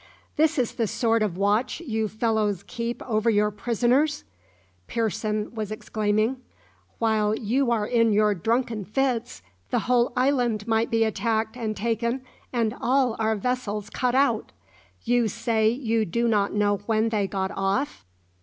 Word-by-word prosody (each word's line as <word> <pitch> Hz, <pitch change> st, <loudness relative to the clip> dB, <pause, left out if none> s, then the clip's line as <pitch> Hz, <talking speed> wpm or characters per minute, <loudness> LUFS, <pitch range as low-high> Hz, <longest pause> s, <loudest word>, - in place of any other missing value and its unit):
"This 315 Hz, +1 st, +2 dB
is 245 Hz, -3 st, 0 dB
the 230 Hz, -, -1 dB
sort 230 Hz, +1 st, +1 dB
of 200 Hz, -5 st, -1 dB
watch 205 Hz, +8 st, +1 dB
you 220 Hz, -9 st, -2 dB
fellows 215 Hz, -3 st, 0 dB
keep 235 Hz, 0 st, -4 dB
over 220 Hz, -1 st, +1 dB
your 210 Hz, -1 st, +2 dB
prisoners!" 240 Hz, -, +1 dB, 0.6 s
Pearson 215 Hz, -1 st, -2 dB
was 215 Hz, -3 st, -4 dB
exclaiming. 215 Hz, +3 st, 0 dB, 0.6 s
"While 215 Hz, -2 st, +1 dB
you 245 Hz, +4 st, 0 dB
are 225 Hz, -3 st, +1 dB
in 230 Hz, 0 st, +3 dB
your 210 Hz, 0 st, +3 dB
drunken 225 Hz, +3 st, -1 dB
fits 235 Hz, -, -1 dB, 0.3 s
the -, -, +1 dB
whole 245 Hz, -1 st, +3 dB
island 245 Hz, -5 st, +1 dB
might 225 Hz, 0 st, +1 dB
be 225 Hz, 0 st, +2 dB
attacked 220 Hz, 0 st, -1 dB
and 220 Hz, -3 st, -3 dB
taken, 235 Hz, +4 st, -1 dB, 0.3 s
and 235 Hz, -2 st, 0 dB
all 250 Hz, -1 st, +2 dB
our 220 Hz, 0 st, +1 dB
vessels 210 Hz, -2 st, -3 dB
cut 250 Hz, -1 st, 0 dB
out. 275 Hz, +1 st, +2 dB, 0.5 s
You 240 Hz, -1 st, +2 dB
say 225 Hz, 0 st, +1 dB
you 230 Hz, -2 st, 0 dB
do 235 Hz, +7 st, 0 dB
not 205 Hz, -3 st, +2 dB
know 205 Hz, 0 st, +1 dB
when 225 Hz, 0 st, +2 dB
they 210 Hz, -3 st, 0 dB
got 190 Hz, -1 st, -2 dB
off? 195 Hz, -, -1 dB
225 Hz, 150 wpm, -25 LUFS, 210-240 Hz, 0.6 s, in